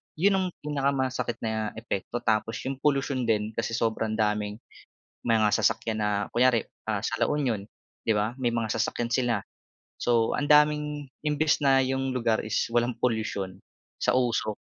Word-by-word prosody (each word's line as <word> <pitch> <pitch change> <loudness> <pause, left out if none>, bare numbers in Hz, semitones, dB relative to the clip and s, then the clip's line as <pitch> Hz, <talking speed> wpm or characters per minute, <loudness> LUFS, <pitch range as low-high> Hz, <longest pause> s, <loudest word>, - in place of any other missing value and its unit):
Yun 195 +6 +3
ang 190 -1 +1 0.2
pinakamasakit 135 -4 0
na 110 -1 -1
epekto 110 +1 -4
tapos 110 0 +1
yung 135 0 -4
polusyon 135 -4 +1
din 105 -1 +1
kasi 115 0 -2
sobrang 110 -1 0
daming 105 -1 0 0.7
mga 110 -3 +3
sasakyan 110 0 +1
na 105 - +1 0.2
kunyari, 120 -1 +3 0.2
ah, 105 -2 0
sa 115 - -1
La - - +3
Union, 130 -8 0 0.4
di 110 - +3
ba? 105 +3 0
May 120 - +2
mga 115 -2 -1
sasakyan 115 +2 -1
sila. 120 -5 +1 0.6
So 115 -2 +2
ang 145 - -1
daming 150 -1 +3 0.2
imbes 150 +1 +2
na 135 -2 +5
yung 135 0 -1
lugar 115 -2 +1
is 110 - 0
walang 120 0 +1
polusyon 100 -5 -1 0.4
sa - - +3
usok, 115 -4 0
120 Hz, 155 wpm, -27 LUFS, 110-135 Hz, 0.7 s, na